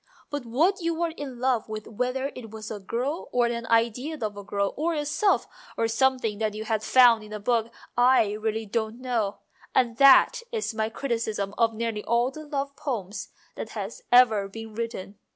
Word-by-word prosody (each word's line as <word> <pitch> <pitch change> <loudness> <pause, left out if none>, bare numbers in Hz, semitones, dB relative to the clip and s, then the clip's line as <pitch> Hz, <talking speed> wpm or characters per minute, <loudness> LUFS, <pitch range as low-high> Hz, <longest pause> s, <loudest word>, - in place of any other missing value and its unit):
But 290 -4 -4
what 335 +12 +2
you 335 0 0
were 335 0 -1
in 270 -5 -7
love 250 -4 0
with 215 -1 -5
whether 250 +5 -2
it 230 -3 -9
was 220 0 -8
a 210 - -5
girl 245 - -3
or 245 -1 +3
an 235 -1 -2
idea 235 +7 +1
of 215 -2 -3
a 205 - -8
girl, 200 0 -1
or 325 +3 0
yourself, 300 +7 +1 0.3
or 230 - +2
some 260 +3 +3
thing 220 -4 -3
that 215 -1 -1
you 215 - -4
had 220 -1 -1
found 235 -2 +6
in 210 - -12
a 210 - -5
book 230 +1 0 0.2
I 245 -3 +4
really 220 +1 -2
don't 220 +2 -2
know; 235 -6 -2 0.3
and 235 -3 +2
that 275 - +7
is 440 - -2
my 220 0 -1
criticism 225 -5 -2
of 230 -1 +2
nearly 225 -2 -2
all 240 +2 +1
the 310 +2 -10
love 280 -1 -3
poems 210 -7 -4 0.2
that - - -6
have - - -4 0.2
ever 225 -5 +6
been 225 +2 -9
written. 210 -3 -5
230 Hz, 195 wpm, -26 LUFS, 215-260 Hz, 0.3 s, that